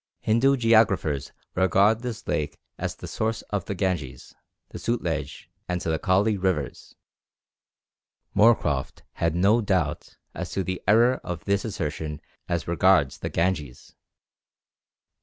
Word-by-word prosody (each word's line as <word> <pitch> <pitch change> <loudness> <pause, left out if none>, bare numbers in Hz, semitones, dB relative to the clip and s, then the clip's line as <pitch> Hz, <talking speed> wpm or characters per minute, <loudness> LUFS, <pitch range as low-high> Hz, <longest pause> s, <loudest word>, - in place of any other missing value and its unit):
Hindu 135 +5 +3
geographers 110 - +2 0.2
regard 100 +4 +3
this 120 -2 -6
lake 75 0 -2 0.2
as - - -4
the - - -9
source 110 0 -2
of 100 -3 -1
the 100 - -4
Ganges, 80 -9 -3 0.4
the - - -8
Sutlej, 80 - -2 0.2
and 90 0 0
the 80 -2 -1
Kali 100 +3 +2
rivers. 90 -8 -2 1.4
Moorcroft 105 - +2 0.2
had 85 -1 +1
no 100 +6 +4
doubt 90 -8 -1 0.2
as - - -5
to 95 - -1
the 95 0 -4
error 120 +4 +4
of 85 -3 -6
this 100 -1 +1
assertion 75 -7 -4 0.3
as 85 -3 -1
regards 85 -5 +3
the - - -3
Ganges. 80 -7 -2
95 Hz, 125 wpm, -25 LUFS, 80-105 Hz, 1.4 s, no